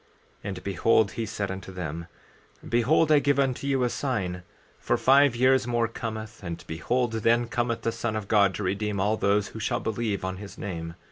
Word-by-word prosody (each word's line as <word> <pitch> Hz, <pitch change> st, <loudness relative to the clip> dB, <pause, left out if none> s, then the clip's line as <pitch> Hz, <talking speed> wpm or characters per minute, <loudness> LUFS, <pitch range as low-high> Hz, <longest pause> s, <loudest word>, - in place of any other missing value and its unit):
14:2 -, -, -35 dB, 0.4 s
And 95 Hz, -2 st, -5 dB
behold, 100 Hz, +3 st, +2 dB
he 115 Hz, -, -3 dB
said 100 Hz, -2 st, -3 dB
unto 95 Hz, 0 st, -7 dB
them: 85 Hz, -2 st, -5 dB, 0.6 s
Behold, 140 Hz, +7 st, +3 dB
I 150 Hz, -, +7 dB
give 140 Hz, 0 st, +2 dB
unto 135 Hz, 0 st, 0 dB
you 135 Hz, -2 st, +1 dB
a 125 Hz, -, +2 dB
sign; 95 Hz, -10 st, -2 dB, 0.4 s
for -, -, 0 dB
five 135 Hz, -1 st, +5 dB
years 130 Hz, 0 st, +3 dB
more 120 Hz, -1 st, +1 dB
cometh, 110 Hz, -1 st, -6 dB
and 85 Hz, -2 st, -5 dB
behold, 120 Hz, +9 st, -1 dB
then 115 Hz, +2 st, +2 dB
cometh 120 Hz, 0 st, -1 dB
the 115 Hz, -, +1 dB
Son 115 Hz, -1 st, -3 dB
of 105 Hz, -2 st, -4 dB
God 100 Hz, -3 st, +3 dB
to 105 Hz, -, -4 dB
redeem 100 Hz, +2 st, -1 dB
all 105 Hz, +3 st, +2 dB
those 100 Hz, -1 st, +1 dB
who 110 Hz, -, -8 dB
shall 105 Hz, -, -1 dB
believe 110 Hz, -3 st, -2 dB
on 95 Hz, 0 st, -3 dB
his 100 Hz, 0 st, -10 dB
name. 85 Hz, -4 st, -5 dB
110 Hz, 200 wpm, -26 LUFS, 95-120 Hz, 0.6 s, I